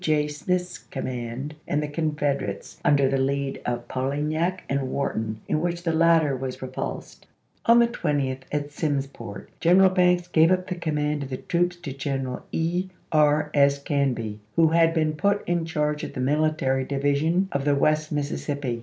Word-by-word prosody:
J. 155 Hz, -4 st, +2 dB
Smith's 180 Hz, +4 st, -2 dB
command 130 Hz, +2 st, -5 dB
and 150 Hz, +1 st, 0 dB
the -, -, -2 dB
Con 155 Hz, 0 st, -2 dB
federates 140 Hz, -9 st, -2 dB
under 140 Hz, -2 st, +4 dB
the 135 Hz, 0 st, +1 dB
lead 140 Hz, +1 st, -1 dB
of 120 Hz, -1 st, -2 dB
Polignac 150 Hz, +7 st, -1 dB
and 135 Hz, -1 st, -1 dB
Wharton 110 Hz, -6 st, -2 dB
in 155 Hz, -, 0 dB
which 175 Hz, 0 st, -2 dB
the 165 Hz, -2 st, 0 dB
latter 165 Hz, -3 st, +4 dB
were 130 Hz, 0 st, -3 dB
repulsed. 130 Hz, -, -6 dB, 0.4 s
On 235 Hz, +1 st, +7 dB
the 235 Hz, 0 st, +6 dB
20th, 145 Hz, -, -1 dB
at 145 Hz, 0 st, -2 dB
Simsport, 140 Hz, -8 st, -4 dB
General 185 Hz, +2 st, +5 dB
Banks 180 Hz, -1 st, +3 dB
gave 165 Hz, -2 st, +4 dB
up 185 Hz, 0 st, +2 dB
the 185 Hz, -, -3 dB
com 170 Hz, -4 st, -3 dB
mand 150 Hz, 0 st, 0 dB
of 135 Hz, -, -5 dB
the 130 Hz, -, -3 dB
troops 175 Hz, +4 st, 0 dB
to 175 Hz, -6 st, -7 dB
General 135 Hz, -2 st, -3 dB
E. 175 Hz, +3 st, 0 dB
E. -, -, -18 dB, 0.6 s
S. 140 Hz, 0 st, +4 dB
Canby, 125 Hz, -8 st, -1 dB, 0.2 s
who 165 Hz, -1 st, +5 dB
had 165 Hz, 0 st, +3 dB
been 155 Hz, -1 st, +2 dB
put 200 Hz, +6 st, 0 dB
in 175 Hz, -1 st, 0 dB
charge 150 Hz, -2 st, -1 dB
of -, -, -5 dB
the -, -, -5 dB
Military 140 Hz, -1 st, +1 dB
Divi 140 Hz, +1 st, 0 dB
sion 165 Hz, +7 st, +1 dB
of 140 Hz, -1 st, -1 dB
the 145 Hz, 0 st, +3 dB
West 155 Hz, +2 st, +1 dB
Mississippi. 145 Hz, -4 st, -2 dB
150 Hz, 180 wpm, -25 LUFS, 135-165 Hz, 0.6 s, On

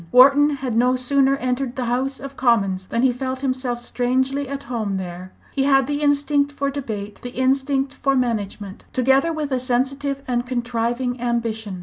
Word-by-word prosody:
Wharton 275 Hz, +3 st, +7 dB
had 260 Hz, -4 st, -3 dB
no 250 Hz, +2 st, +3 dB
sooner 270 Hz, +2 st, +2 dB
entered 255 Hz, -1 st, -2 dB
the 255 Hz, -2 st, -2 dB
House 260 Hz, +3 st, -1 dB
of 275 Hz, 0 st, -8 dB
Commons 195 Hz, -8 st, +1 dB
than 235 Hz, -, -1 dB
he 260 Hz, -, +5 dB
felt 260 Hz, +1 st, -4 dB
himself 255 Hz, -2 st, -1 dB
strangely 260 Hz, +3 st, 0 dB
at 280 Hz, 0 st, -5 dB
home 220 Hz, -7 st, -2 dB
there. 180 Hz, 0 st, -7 dB, 0.2 s
He 270 Hz, -1 st, +1 dB
had 270 Hz, -2 st, +4 dB
the 290 Hz, +2 st, -2 dB
instinct 285 Hz, 0 st, +2 dB
for 280 Hz, -1 st, -2 dB
debate, 215 Hz, -7 st, -5 dB
the 245 Hz, 0 st, -8 dB
instinct 270 Hz, +1 st, +1 dB
for 275 Hz, -1 st, 0 dB
management, 210 Hz, -5 st, -2 dB
together 270 Hz, +5 st, +3 dB
with 305 Hz, -3 st, -3 dB
a 260 Hz, -, +1 dB
sensitive 270 Hz, +2 st, -1 dB
and 245 Hz, -1 st, 0 dB
contriving 245 Hz, 0 st, -2 dB
ambition. 225 Hz, -5 st, -2 dB
255 Hz, 175 wpm, -22 LUFS, 240-275 Hz, 0.2 s, Wharton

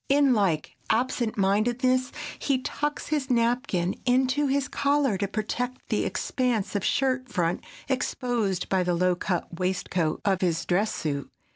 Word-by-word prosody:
In 280 Hz, -1 st, +5 dB
like 190 Hz, -9 st, 0 dB
absent 235 Hz, -1 st, 0 dB
mindedness, 240 Hz, +6 st, +2 dB, 0.3 s
he 265 Hz, -3 st, 0 dB
tucks 295 Hz, 0 st, -3 dB
his 290 Hz, -3 st, -1 dB
napkin 235 Hz, -7 st, +1 dB
into 260 Hz, +3 st, +2 dB
his 275 Hz, 0 st, +1 dB
collar 280 Hz, -5 st, +2 dB
to 200 Hz, -, 0 dB
protect 240 Hz, +5 st, -3 dB
the -, -, +1 dB
expanse 245 Hz, -7 st, -1 dB
of 205 Hz, -, 0 dB
shirt 260 Hz, -2 st, +1 dB
front 175 Hz, -5 st, 0 dB, 0.2 s
exposed 245 Hz, -7 st, -1 dB
by 190 Hz, -1 st, +2 dB
the 175 Hz, -1 st, +1 dB
low 180 Hz, +1 st, +3 dB
cut 175 Hz, -1 st, -3 dB
waistcoat 180 Hz, -3 st, 0 dB
of 195 Hz, -2 st, +2 dB
his 165 Hz, -3 st, 0 dB
dress 200 Hz, +6 st, +1 dB
suit. 140 Hz, -3 st, -3 dB
230 Hz, 145 wpm, -26 LUFS, 185-255 Hz, 0.3 s, In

